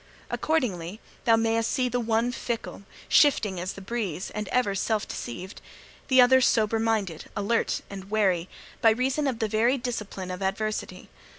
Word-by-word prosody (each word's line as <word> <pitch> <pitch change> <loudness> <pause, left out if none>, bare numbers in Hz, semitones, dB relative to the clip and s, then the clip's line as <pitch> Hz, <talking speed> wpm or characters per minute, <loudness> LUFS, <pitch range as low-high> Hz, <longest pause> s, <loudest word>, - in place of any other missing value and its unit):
Accordingly, 210 - -1 0.3
thou 230 -2 +6
mayst 225 0 +1
see 255 -1 +1
the 245 0 -1
one 230 +1 +1
fickle, 235 -4 -4 0.3
shifting 210 - +4
as 185 +2 -3
the 200 - -10
breeze, 195 -5 -3
and 210 0 -4
ever 250 -6 +1
self 210 +2 -1
deceived; 185 - -7 0.5
the 260 -1 +4
other 260 +1 +7
sober 225 -2 +2
minded, 215 -7 -1
alert, 205 +3 0
and 195 -1 -9
wary, 190 -5 +1 0.3
by 230 - +7
reason 260 +6 +1
of 255 -4 -1
the 220 - 0
very 230 +5 +2
discipline 210 -7 -5
of 180 +1 -6
adversity. 210 +3 -3
220 Hz, 160 wpm, -26 LUFS, 195-240 Hz, 0.5 s, other